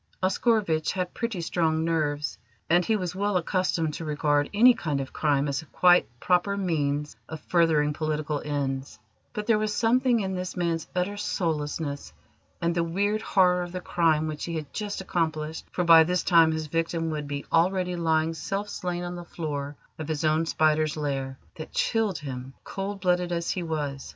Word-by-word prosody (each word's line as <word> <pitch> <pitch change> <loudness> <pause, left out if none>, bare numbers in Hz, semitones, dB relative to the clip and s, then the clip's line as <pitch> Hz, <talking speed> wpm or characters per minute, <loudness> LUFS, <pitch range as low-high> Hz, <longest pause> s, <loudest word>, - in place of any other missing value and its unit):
Oscarovitch 190 -5 +1
had 185 -2 -3
pretty 230 -6 -3
strong 160 -1 0
nerves, 150 -3 -1 0.4
and 175 +1 +5
he 220 - +1
was 180 -4 -2
well 200 0 +1
accustomed 175 -3 0
to 165 - -5
regard 145 -1 +1
any 240 +5 +7
kind 150 -10 -2
of 135 -1 -5
crime 145 -2 +1
as 140 -1 -1
a 160 - -16
quite 180 +3 +4
proper 185 +5 +1
means 150 -6 -1
of 160 - -6
furthering 155 -4 +2
political 150 -1 -2
ends: 140 -2 -3 0.3
but 210 - -4
there 215 -1 +3
was 215 0 -1
something 240 +2 +3
in 190 -1 -2
this 185 0 -4
man's 170 -2 -1
utter 185 +3 -1
soullessness 150 -6 -2 0.5
and 170 0 0
the 170 0 +1
weird 200 +6 0
horror 180 -2 +3
of 175 0 -5
the 185 - -3
crime 160 -3 +1
which 155 -1 -4
he 170 - -4
had 150 -3 -5
just 205 -2 -3
accomplished 160 -3 -2
for 180 - -1
by 165 -1 +8
this 180 +2 0
time 165 -2 +5
his 160 0 -2
victim 165 +1 -1
would 150 -2 -4
be 145 0 -4
already 180 +2 +2
lying 160 -1 +1
self 195 +5 -3
slain 180 -3 -3
on 175 0 -4
the 175 - -7
floor 145 -4 -5 0.2
of 155 - -5
his 155 -1 -2
own 155 +1 +2
spider's 155 -1 +2
lair 135 -3 -3 0.2
that 155 - -7
chilled 220 -6 +1
him, 135 -2 -7
cold 195 +1 -5
blooded 180 -1 +1
as 170 -1 -1
he 185 - -2
was. 150 -5 -3
165 Hz, 185 wpm, -26 LUFS, 150-180 Hz, 0.5 s, by